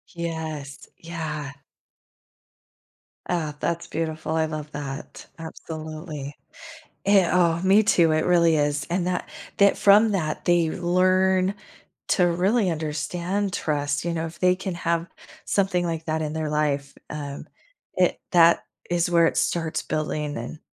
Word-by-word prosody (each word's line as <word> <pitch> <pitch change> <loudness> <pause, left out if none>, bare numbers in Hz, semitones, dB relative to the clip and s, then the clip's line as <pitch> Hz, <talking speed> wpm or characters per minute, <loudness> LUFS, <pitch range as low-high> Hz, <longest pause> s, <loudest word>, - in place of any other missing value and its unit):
Yes, 160 -4 -5
yeah. 155 -4 -5 1.8
Uh, 160 -4 -1
that's 170 0 -2
beautiful 160 0 -3
I 160 0 +2
love 155 -1 -6
that, 140 -1 -7
absolutely, 155 -2 -7 0.7
it 200 -3 +5
oh, 170 -2 +3
me 195 +3 +5
too 170 -6 +4
it 155 0 +1
really 170 -2 +4
is, 145 0 0
and 180 0 0
that 180 -1 -1 0.3
that 200 -2 +4
from 210 +2 +6
that, 155 -6 -2
they 175 -2 +3
learn 185 +2 +2 0.5
to 180 - +3
really 185 +4 +2
understand 170 +5 -2
trust, 145 -1 -1
you 170 - -1
know, 165 0 -2
if 165 - -10
they 180 0 +4
can 190 -1 -4
have 170 0 -1 0.4
something 190 -3 +1
like 165 -1 -3
that, 160 0 -1
in 155 -1 -3
their 155 -1 -2
life, 145 -2 -1 0.2
um, 145 -2 -6 0.5
it - - +2
that 170 -1 +5 0.3
is 175 0 +1
where 170 -1 +5
it - - 0
starts 165 -2 0
building, 150 -1 -2
and 120 +7 -6
165 Hz, 140 wpm, -24 LUFS, 155-180 Hz, 1.8 s, from